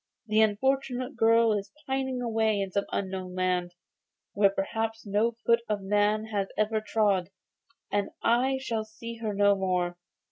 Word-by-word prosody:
The 215 0 +3
unfortunate 255 +4 0
girl 230 -1 +4
is 200 -1 -3
pining 265 -2 -2
away 220 -2 +1
in 195 -1 -2
some 200 +1 0
unknown 185 -2 -3
land, 180 -1 0 0.6
where 200 -1 +4
perhaps 225 +3 -3
no 210 +4 +1
foot 235 0 +5
of 205 -2 -1
man 210 +2 +2
has 200 -1 0
ever 215 +1 +1
trod, 205 -4 +1 0.6
and 205 -1 0
I 255 +3 +3
shall 230 -4 -2
see 230 +2 -9
her 225 -2 -3
no 200 0 +5
more. 180 -2 -1
215 Hz, 150 wpm, -28 LUFS, 195-230 Hz, 0.6 s, foot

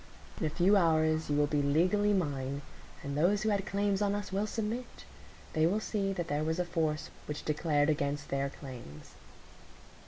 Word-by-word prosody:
"In 160 - +1
a - - 0
few 185 +6 +3
hours 160 -3 +2
you 145 - +1
will 145 - +4
be 145 0 +1
legally 180 +9 +3
mine, 140 -7 -1 0.4
and 140 0 -4
those 190 +7 +3
who 220 - +2
had 200 -2 0
claims 200 0 0
on 200 0 +2
us 205 -1 -4
will 200 +2 0
submit,—they 215 -7 -3
will 200 +5 +1
see 200 -2 -1
that 175 -3 -3
there 145 0 0
was 160 +2 0
a 180 - 0
force 160 -3 -1 0.2
which 150 0 -5
declared 150 -1 +2
against 145 0 -2
their 140 0 0
claims." 120 - -10
160 Hz, 180 wpm, -31 LUFS, 145-200 Hz, 0.4 s, will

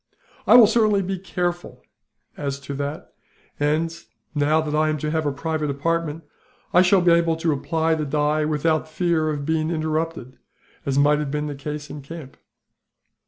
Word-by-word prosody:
"I - - +7
will 245 -2 +10
certainly 210 -2 +3
be 190 0 -3
careful 175 -2 -4 0.5
as 140 -1 -4
to 140 +1 -6
that 145 +2 -5 0.5
and, 155 +3 0 0.4
now 150 +1 +2
that 155 -1 -2
I 155 0 +2
am 155 - 0
to 150 +1 -3
have 160 -1 0
a - - +1
private 155 +1 -2
apartment, 165 +2 -2 0.5
I 180 - +7
shall 185 +1 +4
be 175 -1 +4
able 170 -1 +3
to 165 0 0
apply 160 +3 0
the 155 -1 -1
dye 150 +2 +1
without 155 +1 +1
the - - -20
fear 170 -3 +1
of 145 -2 -3
being 160 0 0
interrupted, 155 -5 -3 0.5
as 135 0 0
might 145 +1 +4
have 150 -2 -2
been 150 +1 -2
the 150 - -4
case 150 +2 -6
in 150 - -7
camp." 140 -1 -10
155 Hz, 180 wpm, -23 LUFS, 145-165 Hz, 0.5 s, will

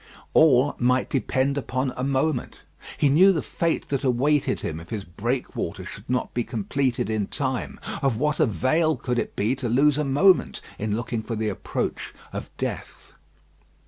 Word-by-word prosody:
All 140 -3 +5
might 125 +1 +2
depend 135 +1 +1
upon 130 -1 -2
a 125 - -3
moment. 135 0 -1 0.3
He 145 - +3
knew 175 +8 +6
the 165 -5 -1
fate 165 -1 -1
that 140 -1 -1
awaited 135 +3 +2
him 80 - -4
if 85 - -12
his 105 -4 -4
breakwater 120 +9 -3
should 100 +4 -10
not 125 0 -1
be 120 - 0
completed 125 +2 -1
in 110 -2 -1
time. 130 -3 -3 0.2
Of 135 -5 +1
what 150 +3 0
avail 155 - +2
could 125 0 -1
it - - -4
be 110 +5 +1
to 130 -3 -3
lose 140 +4 +3
a - - +1
moment 150 +7 +3 0.2
in 105 0 -1
looking 115 0 -3
for 115 +1 -4
the 110 0 -1
approach 100 - -4 0.2
of - - -5
death? - - -5
130 Hz, 170 wpm, -25 LUFS, 115-145 Hz, 0.3 s, knew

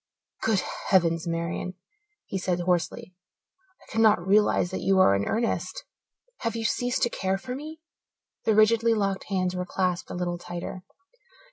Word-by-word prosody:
"Good 220 -4 +2 0.3
heavens, 165 -3 +3
Marian!" 170 +2 -3 0.5
he 190 - -3
said 180 -1 -1
hoarsely. 180 +1 -1 0.7
"I - - -17
cannot 215 -5 +4
realize 200 -2 +3
that - - -3
you 195 0 +3
are 185 - +6
in 100 0 0
earnest. 235 - -1 0.6
Have 230 -1 -2
you 225 -1 -3
ceased 245 +2 0
to 240 - +3
care 190 0 -1
for 250 +6 -6
me?" 310 +4 -8 0.6
The 220 - +3
rigidly 225 +1 +4
locked 195 -2 -1
hands 185 -2 -1
were 180 - -1
clasped 180 -1 -1
a - - -5
little 175 -1 -2
tighter. 175 +1 -6
190 Hz, 155 wpm, -26 LUFS, 180-225 Hz, 0.7 s, are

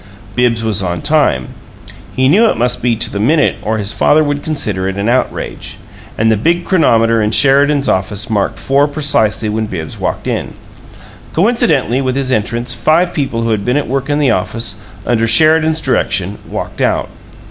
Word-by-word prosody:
Bibbs 120 -2 +1
was 110 -4 0
on 90 -2 -3
time. 145 - +1 0.7
He 130 0 +2
knew 210 +11 +4
it - - -1
must 120 +2 0
be 120 -1 +1
"to 110 - -1
the 100 - -3
minute" 145 +8 +2
or 110 +1 -2
his 105 0 -2
father 155 +1 +3
would 145 -1 -2
consider 105 - -2
it 95 - -3
an 100 +2 -2
outrage; 125 +2 -2 0.4
and 110 +1 +2
the 110 - +2
big 170 - 0
chronometer 115 - +2
in 105 - +1
Sheridan's 140 +4 +3
office 100 +2 -1
marked 105 -3 -1
four 140 +2 +1
precisely 145 -8 0
when 110 +1 -2
Bibbs 80 -6 -6
walked - - -3
in. - - -3 0.8
Coincidentally 160 - +1
with 130 -1 -1
his 135 -1 -1
entrance 120 +1 -1
five 155 +9 +1
people 125 -6 -2
who 115 - 0
had 105 -2 -1
been 125 +5 0
at 145 - -2
work 135 +2 -2
in 145 - +1
the 145 -5 +2
office, 115 -3 -2 0.3
under 115 -2 +1
Sheridan's 160 +3 +4
direction, 100 - -1
walked - - -5
out. - - 0
125 Hz, 180 wpm, -14 LUFS, 110-145 Hz, 0.8 s, knew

